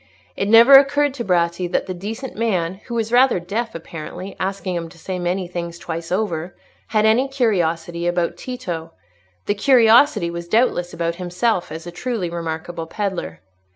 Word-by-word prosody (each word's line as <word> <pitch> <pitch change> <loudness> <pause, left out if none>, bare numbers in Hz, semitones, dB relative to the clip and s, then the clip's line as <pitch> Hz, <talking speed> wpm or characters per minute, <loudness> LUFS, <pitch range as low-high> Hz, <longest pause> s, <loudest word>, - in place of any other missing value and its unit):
It 200 - -1
never 230 +5 +8
occurred 285 0 +1
to 255 -3 -4
Bratti 175 -2 0
that - - 0
the 185 - -4
decent 220 +8 -6
man 190 -4 -1
(who 240 - -4
was 225 -1 -1
rather 250 -4 +4
deaf, 215 +6 -4
apparently, 170 +3 -8
asking 190 -1 -2
him 165 -1 -4
to 165 - -17
say 180 +2 -5
many 180 +1 -1
things 170 -1 -5
twice 165 0 -6
over) 180 -3 -2 0.3
had 215 -1 +2
any 230 +5 +3
curiosity 175 -9 0
about 175 -1 0
Tito; 175 -11 -6 0.5
the - - +1
curiosity 225 -4 +4
was 170 0 -6
doubtless 180 -4 +1
about 170 0 -2
himself, 180 +1 -1
as 160 +2 -7
a 175 - -7
truly 195 -2 -3
remarkable 165 0 -5
pedlar. 175 - -4
180 Hz, 165 wpm, -21 LUFS, 170-225 Hz, 0.5 s, never